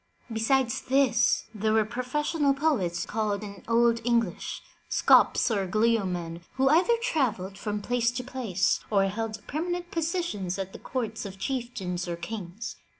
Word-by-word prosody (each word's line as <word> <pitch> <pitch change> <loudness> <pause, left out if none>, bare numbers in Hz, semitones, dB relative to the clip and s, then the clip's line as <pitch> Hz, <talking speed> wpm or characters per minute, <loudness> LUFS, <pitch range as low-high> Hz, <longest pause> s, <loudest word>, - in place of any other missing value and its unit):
Besides 235 +2 +1
this, 270 -1 +3
there 215 0 0
were 220 -1 +4
pro 240 +3 -4
fessional 290 +2 +1
poets 205 - +1
called 215 -2 -1
in 200 -2 -9
Old 230 0 +3
English, 230 -6 0 0.3
"scops - - +4
or 200 -3 0
gleomen,'' 185 -6 0
who 265 0 +3
either 370 +10 +4
travelled 225 - 0
from 205 +1 -4
place 240 0 +1
to 250 - -3
place, 235 -8 0
or 200 -2 +3
held 215 +1 -4
permanent 350 +4 -3
positions 330 - -2
at 195 -1 -4
the - - -9
courts 225 -4 -3
of 195 -2 -7
chieftains 205 -8 -3
or 170 - -2
kings. 195 +3 -6
225 Hz, 150 wpm, -27 LUFS, 195-260 Hz, 0.3 s, were